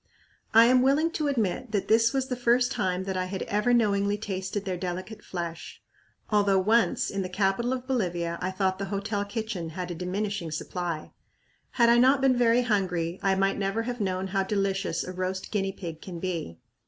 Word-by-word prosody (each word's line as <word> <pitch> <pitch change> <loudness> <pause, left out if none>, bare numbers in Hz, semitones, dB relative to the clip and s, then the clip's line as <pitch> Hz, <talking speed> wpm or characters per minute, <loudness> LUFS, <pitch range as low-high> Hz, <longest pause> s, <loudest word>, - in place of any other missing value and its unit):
I 225 +1 +8
am 250 +1 +5
willing 290 +5 +3
to 305 -3 -1
admit 250 -2 -1
that 200 -1 0
this 225 +1 +4
was 265 -1 -1
the 255 - -2
first 245 +1 +2
time 190 -6 -1
that 190 0 -3
I 185 0 0
had 190 +1 -4
ever 210 +4 0
knowingly 205 -3 +2
tasted 195 -1 -4
their 185 -2 -2
delicate 185 +4 -5
flesh, 170 -2 -6 0.5
although 200 -2 +3
once 220 +5 +2
in 200 - -2
the 185 - -4
capital 195 +6 0
of 255 -1 -3
Bolivia 175 -10 -1
I 185 - -1
thought 190 0 -1
the 200 - -2
hotel 200 +1 -2
kitchen 205 -5 -4
had 180 +2 -5
a - - -2
diminishing 185 +1 -3
supply! 165 +1 -4 0.6
Had 235 -2 +4
I 235 0 +6
not 260 +3 +5
been 270 -1 +3
very 240 0 +3
hungry, 185 -6 0
I 195 -1 +2
might 195 +1 +1
never 195 +3 -1
have 245 0 -4
known 190 -1 -1
how 195 0 +1
delicious 195 0 -1
a 185 - -6
roast 185 +1 -3
guinea 195 -2 0
pig 170 -5 -8
can 180 -3 -7
be. 165 - -4
195 Hz, 195 wpm, -27 LUFS, 185-230 Hz, 0.6 s, I